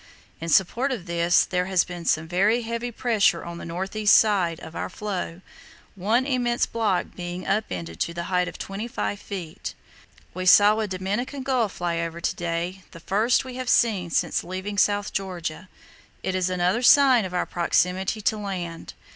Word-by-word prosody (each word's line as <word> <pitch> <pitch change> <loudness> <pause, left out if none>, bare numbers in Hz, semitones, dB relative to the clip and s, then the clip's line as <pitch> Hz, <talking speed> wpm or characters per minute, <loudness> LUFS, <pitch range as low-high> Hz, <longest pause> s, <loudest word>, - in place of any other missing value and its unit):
In 165 - -5
support 230 - +2
of 230 -9 -4
this 170 0 +3
there 180 0 -1
has 190 -2 +3
been 175 -2 -8
some 160 0 +1
very 200 +7 +2
heavy 235 +1 -3
pressure 220 -7 +1
on 170 0 -7
the - - -8
north 180 +5 -5
east 210 -1 +6
side, 185 -6 +2
of 160 - -10
our - - -3
floe, 185 -3 -5 0.5
one 220 +7 +1
immense 245 -3 +1
block 215 -5 -1
being 175 +1 -6
up 215 +1 +1
ended 85 -2 -6
to 170 - -2
a - - -2
height 180 0 0
of - - -7
25 205 0 -4
ft. 180 -6 -6 0.6
We 185 +1 -3
saw 205 +3 +7
a 215 - -1
Dominican 205 +9 -3
gull 255 -5 +1
fly 175 -2 -2
over 165 0 -4
to - - -1
day, 175 +2 -3
the 165 - -12
first 215 +9 +1
we 255 -1 -7
have 255 -1 -3
seen 200 -7 +3
since - - 0
leaving 190 +3 -4
South 205 +1 +1
Georgia; 180 -2 -4 0.5
it 190 - -1
is 185 -1 0
another 180 +5 +1
sign 260 -2 +6
of 180 -1 -5
our 180 - +1
proximity 180 +4 0
to 215 +1 +1
land. 180 -5 -5
190 Hz, 180 wpm, -25 LUFS, 175-220 Hz, 0.6 s, saw